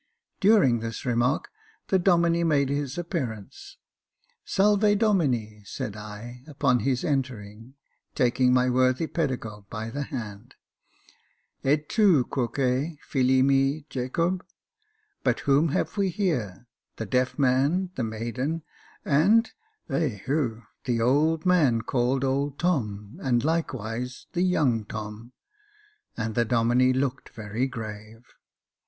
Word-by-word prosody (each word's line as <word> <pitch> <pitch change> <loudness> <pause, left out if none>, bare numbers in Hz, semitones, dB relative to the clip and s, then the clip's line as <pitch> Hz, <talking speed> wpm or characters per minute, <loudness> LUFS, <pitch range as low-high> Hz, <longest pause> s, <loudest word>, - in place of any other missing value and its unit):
During 195 - +4
this 115 0 -6
remark 120 +3 +1 0.4
the 190 - +3
Domine 170 -2 +3
made 140 -3 +2
his 140 0 -2
appearance, 130 - -5 0.4
*' - - -44
Salve 205 +1 +4
Domine, 130 - +1
^^ 100 - -20
said 105 - -5
I, 110 +4 -9
upon 140 -4 +1
his 130 -1 0
entering, 120 -3 -3 0.4
taking 125 0 +3
my 125 0 +3
worthy 130 +4 +2
pedagogue 120 - -4
by 110 +1 -5
the 145 - -4
hand. 110 -8 -7 1.1
'^ - - +2
Et 150 0 +1
tu 190 - +4
quoque, 120 -3 -3
Jilt 130 -1 +1
mi, 140 +2 +2
Jacohe 165 +8 -1
I - - -33 0.8
But - - +1
whom 145 +3 +3
have 150 - -1
we 195 -2 +2
here? 145 - -2 0.3
the 110 - -5
deaf 125 +4 0
man, 140 +7 +2
the 130 - -3
maiden, 120 +8 -3 0.4
and 200 +11 +4 0.2
— 435 - -47
ehu! 125 - -1
— - - -50
the 120 -2 0
old 150 +7 +2
man 145 -11 +3
called 125 +2 0
old 140 +1 -1
Tom, 105 - -2
and 120 -3 +1
likewise 125 -6 -3
the 175 - 0
young 145 -11 +2
Tom; 110 +3 -8 0.4
" 420 0 -35
and 110 -1 -2
the 120 - +2
Domine 120 +2 +3
looked 130 0 -2
very 110 +4 -3
grave. 110 -1 -8
130 Hz, 135 wpm, -26 LUFS, 115-160 Hz, 1.1 s, During